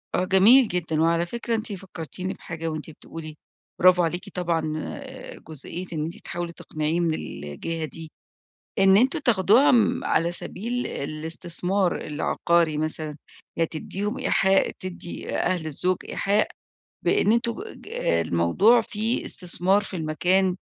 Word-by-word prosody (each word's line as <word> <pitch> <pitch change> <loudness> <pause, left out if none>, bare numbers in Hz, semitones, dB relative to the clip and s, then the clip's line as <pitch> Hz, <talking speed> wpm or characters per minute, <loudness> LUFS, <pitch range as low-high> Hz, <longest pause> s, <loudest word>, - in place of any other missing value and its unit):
آه 180 - +1
جميل 215 +8 +7
جدًا، 165 -4 -1
وعلى 165 +1 +2
فكرة 235 +4 -2
أنتِ 220 -1 -2
فكّرتيني 185 -1 -6
بحاجة 165 -1 -6
وأنتِ 155 0 -4
بتقولي 155 0 -9 0.4
برافو 180 0 +6
عليكِ 175 +2 -2
طبعًا 170 -2 -1 0.9
جزئية 160 +4 -4
إن 150 - -2
أنتِ 165 +2 -5
تحاولي 175 -1 -5
تقنعيه 155 +1 -2
من 170 -2 +1
الجهة 155 - -5
دي، 160 0 -8 0.7
إن 195 0 +6
أنتم 260 +9 +3
تاخدوها، 230 +1 +4
امم، 240 -4 +3
على 170 +2 +1
سبيل 235 +8 -3
الاستثمار 170 +5 -1
العقاري 155 +1 0
مثلًا، 155 -1 -2 0.4
يعني 165 - +2
تدّيهم 205 +8 -4
إيحاء 195 0 +3
تدّي 185 -2 -5
أهل 175 -4 0
الزوج 180 +5 +1
إيحاء 205 +2 +1 0.6
بإن 400 - +3
أنتم 235 0 +2 0.2
ج - - -15 0.4
الموضوع 180 - +4
فيه 220 +2 -1
استثمار 185 +2 +1
في 195 - -7
المكان، 180 +4 +1
175 Hz, 130 wpm, -25 LUFS, 160-200 Hz, 0.9 s, جميل